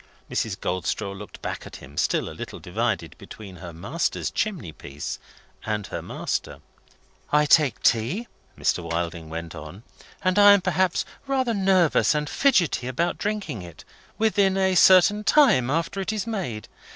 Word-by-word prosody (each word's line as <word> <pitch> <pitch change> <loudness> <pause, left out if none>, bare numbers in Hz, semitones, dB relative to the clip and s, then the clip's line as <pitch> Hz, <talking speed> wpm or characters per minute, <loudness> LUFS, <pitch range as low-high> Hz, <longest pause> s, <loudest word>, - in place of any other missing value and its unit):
Mrs. - - -2
Goldstraw 95 +2 -2
looked 100 +1 -11
back - - -5
at - - -11
him, 70 - -12
still - - 0
a - - -7
little - - -7
divided 100 -3 -2
between 100 -4 -11
her 85 +1 -9
master's 100 - -2
chimney 190 - -2
piece 75 -1 -7 0.4
and 105 -2 -2
her - - -5
master. - - -4 0.7
"I 150 0 +4
take 145 -5 +3
tea," 130 - +1 0.3
Mr. - - +1
Wilding 85 -1 -4
went 85 0 -6
on; 80 +6 -10 0.4
"and 185 +1 +2
I 205 0 +9
am 200 - +3
perhaps 185 -1 +1 0.2
rather 260 -3 +1
nervous 190 -6 +3
and 150 0 -1
fidgety 180 - +2
about 165 +7 -1
drinking 210 - -3
it, 85 -3 -12 0.3
within 200 -3 +2
a 190 -1 +2
certain 190 +3 +6
time 210 - +4
after 165 +6 -1
it 190 - -2
is 215 -1 -3
made. 180 - -4
150 Hz, 155 wpm, -24 LUFS, -, 0.7 s, I